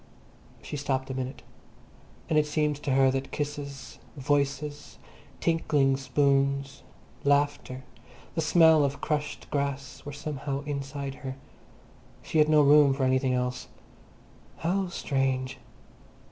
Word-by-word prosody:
She 150 - -5
stopped 135 -2 -2
a - - -3
minute. 130 0 -5 0.8
And 155 - +3
it 150 - +1
seemed 150 -1 0
to 145 -2 -2
her 135 0 +5
that 135 0 -3
kisses, 145 -2 -5 0.2
voices, 145 +1 -1 0.4
tinkling 145 -5 +2
spoons, 140 0 +1 0.4
laughter, 140 -2 +1 0.5
the 165 - -1
smell 160 -1 +6
of 140 0 -1
crushed 150 -1 -3
grass 140 -1 -3
were 145 - -6
somehow 145 -1 -4
inside 140 -1 -4
her. 130 -1 -5 0.9
She 160 - 0
had 150 0 +5
no 155 -1 +6
room 145 -1 +6
for 135 - -1
anything 130 0 +2
else. 125 0 -2 0.9
How 185 +3 0
strange! 135 -5 -1
140 Hz, 120 wpm, -28 LUFS, 135-150 Hz, 0.9 s, smell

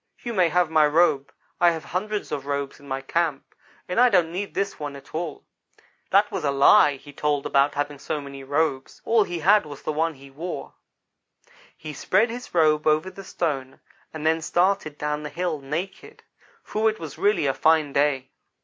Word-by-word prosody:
You 240 - -4
may 180 -5 +3
have 175 0 +1
my 155 -2 +5
robe. 150 -3 +2 0.3
I 175 - +6
have 165 -2 -3
hundreds 210 +3 -3
of 140 -2 -4
robes 140 -1 -3
in 140 - -15
my 135 0 -3
camp, 155 0 -2 0.3
and 180 - -1
I 250 0 +7
don't 175 -6 +3
need 195 +3 -5
this 200 0 -2
one 145 -2 -5
at 140 - -14
all.' 160 -1 -4 0.7
That 200 +2 +3
was 175 - -3
a 145 - +1
lie 140 +1 +5
he 140 +1 -14
told 145 0 -1
about 140 +1 +2
having 145 0 -3
so 150 - -3
many 140 -1 -9
robes. 145 -1 -2
All 225 -1 +4
he 175 - -4
had 200 +6 +4
was 145 -3 -10
the 155 - -2
one 160 +1 0
he 135 0 -15
wore. 170 +6 -6 1.0
"He 155 -1 -8
spread 210 - +1
his 245 +1 -8
robe 155 -2 +3
over 155 +4 +2
the 195 +1 -10
stone, 140 -8 -3 0.3
and 155 -1 -7
then 160 +1 +2
started 175 -2 0
down 150 0 -2
the 150 - -6
hill, 175 -3 -2
naked, 180 - -6 0.4
for 220 +1 +1
it 215 - -5
was 160 -4 -8
really 205 -6 +2
a 135 - +2
fine 155 -2 +2
day. 140 -2 +1
155 Hz, 195 wpm, -24 LUFS, 145-180 Hz, 1.0 s, I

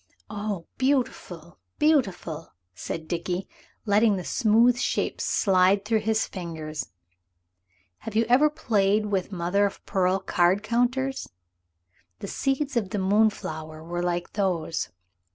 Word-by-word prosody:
"Oh, 205 -4 -4
beautiful, 240 - -1 0.2
beautiful!" 195 - 0 0.2
said 160 - -6
Dickie, 175 +2 -3 0.4
letting 210 0 +4
the 185 - -4
smooth 235 +4 +3
shapes - - -1
slide 195 0 +3
through 220 0 +2
his 220 +1 +1
fingers. 160 -4 -6 1.1
Have 225 - -8
you 225 +1 +3
ever 265 +5 +5
played 210 -6 +1
with 200 -2 -1
mother 190 +3 +1
of 200 - -10
pearl 185 0 +1
card 185 +1 +2
counters? 255 +4 0 0.9
The - - -7
seeds 275 +5 -1
of 215 -5 0
the 210 - -3
moonflower 190 -6 0
were 175 +1 -3
like 175 0 -2
those. 180 -5 -1
200 Hz, 120 wpm, -26 LUFS, 175-225 Hz, 1.1 s, ever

